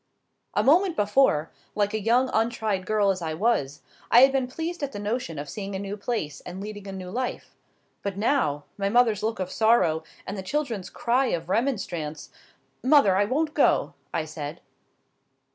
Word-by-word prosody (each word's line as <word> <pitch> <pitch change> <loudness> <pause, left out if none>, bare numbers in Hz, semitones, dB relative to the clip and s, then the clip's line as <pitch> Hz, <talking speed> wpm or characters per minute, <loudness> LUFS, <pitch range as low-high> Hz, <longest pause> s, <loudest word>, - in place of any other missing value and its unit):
A - - +3
moment 345 +5 +4
before, 205 - +2 0.2
like 205 0 +1
a 220 - 0
young 245 +5 +2
untried 220 -4 0
girl 210 -2 +3
as 185 -1 -4
I 160 -1 -3
was, 160 - 0 0.3
I 240 - +7
had 270 +1 +7
been 265 -2 0
pleased 325 +6 -5
at 280 -1 -3
the - - -5
notion 205 -4 -3
of 145 +1 -5
seeing 195 +5 -5
a - - -1
new 200 +1 -4
place, 200 - -3
and 180 +1 -7
leading 205 0 -7
a - - -5
new 185 -1 -7
life. 250 +3 -4 0.5
But 200 -1 -4
now,—my 195 - 0
mother's 225 -2 +3
look 220 0 -2
of 185 -1 -3
sorrow, 220 -8 +3 0.2
and 195 - -5
the 195 - -4
children's 225 -3 -3
cry 250 +3 +1
of 170 -5 -2
remonstrance: 175 - -2 0.5
"Mother; 260 -8 +5
I 200 +2 +3
won't 300 +7 0
go," 150 - +3 0.2
I 160 - -1
said. 155 0 -7
205 Hz, 180 wpm, -26 LUFS, 185-245 Hz, 0.5 s, I